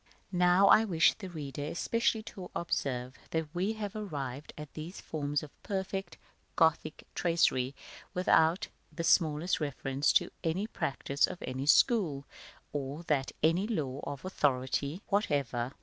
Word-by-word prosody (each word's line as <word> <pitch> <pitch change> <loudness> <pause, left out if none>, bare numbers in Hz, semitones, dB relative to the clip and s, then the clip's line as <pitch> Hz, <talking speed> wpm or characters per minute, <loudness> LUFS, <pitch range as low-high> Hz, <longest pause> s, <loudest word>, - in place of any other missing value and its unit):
§ - - -40
XI. - - -34 0.2
Now, 180 +1 +5
I 215 - +7
wish 170 -6 +4
the 190 -4 -8
reader 145 -4 -5
especially 220 +7 0
to 190 -4 -8
observe 130 -6 -2
that 160 -1 -2
we 190 +5 0
have 210 -1 -5
arrived 145 -9 -5
at 150 -2 -8
these 160 +5 -7
forms 145 -1 -2
of 150 - -9
perfect 190 -2 -3 0.4
Gothic 160 -1 +2
tracery 140 -6 +2 0.4
without 175 -1 +3 0.2
the 170 - -4
smallest 165 0 +3
reference 140 -1 0
to - - +3
any 175 +5 0
practice 140 -8 0
of - - -6
any 130 +2 -4
school, 160 - +4 0.5
or 145 +3 -4
to 150 -5 +1 0.2
any 170 +6 +3
law 145 - -2
of 145 +4 -6
authority 140 0 0
whatever. 140 - 0
160 Hz, 145 wpm, -31 LUFS, 140-185 Hz, 0.5 s, I